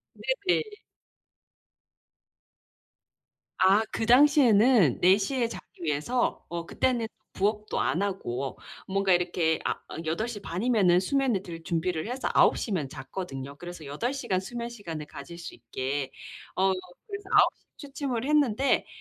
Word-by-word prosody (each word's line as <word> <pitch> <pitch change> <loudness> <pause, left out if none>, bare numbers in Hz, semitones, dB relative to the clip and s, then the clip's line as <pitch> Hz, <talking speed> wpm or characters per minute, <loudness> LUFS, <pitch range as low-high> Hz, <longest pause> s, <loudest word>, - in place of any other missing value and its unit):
네네. 430 -2 0 2.9
아. 195 +3 +5
그 225 - -1
당시에는 245 - +6
4 185 +2 +6
시에 235 +3 0
자기 - - -8 0.2
위해서 160 - 0
어 170 -1 -5
그때는 240 0 0 0.3
부업도 210 +2 -1
안 180 - +1
하고 135 -10 -3 0.3
뭔가 195 0 +1
이렇게 175 -2 +2
아 - - +1 0.2
어 - - -8
8 195 +9 -1
시 210 -4 -6
반이면은 190 -2 +2
수면을 250 -2 +1
들 165 -2 -8
준비를 165 +1 -1
해서 255 +2 -2
9 - - +5
시면 180 - -2
잤거든요. 140 0 -7
그래서 175 -1 -9
8 225 - -2
시간 225 -9 -1
수면 235 +4 -5
시간을 165 -10 -7
가질 170 +5 -10
수 170 - -8
있게. 130 +3 -3 0.5
어 190 0 +3 0.3
그래서 400 -2 -7
9 - - +7
시 - - -36 0.2
취침을 270 -4 -3
했는데 280 -3 +2
195 Hz, 245 characters per minute, -28 LUFS, 165-245 Hz, 2.9 s, 9